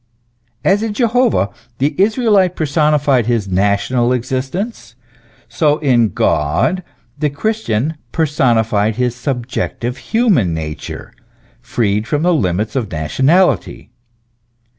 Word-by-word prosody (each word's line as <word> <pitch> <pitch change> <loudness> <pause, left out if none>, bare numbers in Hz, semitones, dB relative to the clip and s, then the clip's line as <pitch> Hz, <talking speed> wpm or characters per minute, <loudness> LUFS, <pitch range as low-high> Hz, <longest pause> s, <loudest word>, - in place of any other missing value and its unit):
As 195 +2 +3
in 220 -2 -3
Jehovah 235 - +2 0.3
the 145 +3 0
Israelite 205 -4 +3
personified 150 -5 +2
his 115 -4 0
national 100 +6 +1
existence, 130 - -4 0.5
so 150 -2 +1
in 120 -7 +2
God 80 - +1 0.4
the 150 -1 +1
Christian 155 - -2
personified 115 -8 +1
his 125 0 -1
subjective 125 -1 -3
human 175 - +1
nature, 80 -1 -7 0.5
freed 105 -1 -1
from 150 +1 -1
the 180 0 +3
limits 105 - -1
of 115 -7 -2
nationality. 135 - +1
130 Hz, 100 wpm, -16 LUFS, 110-170 Hz, 0.5 s, As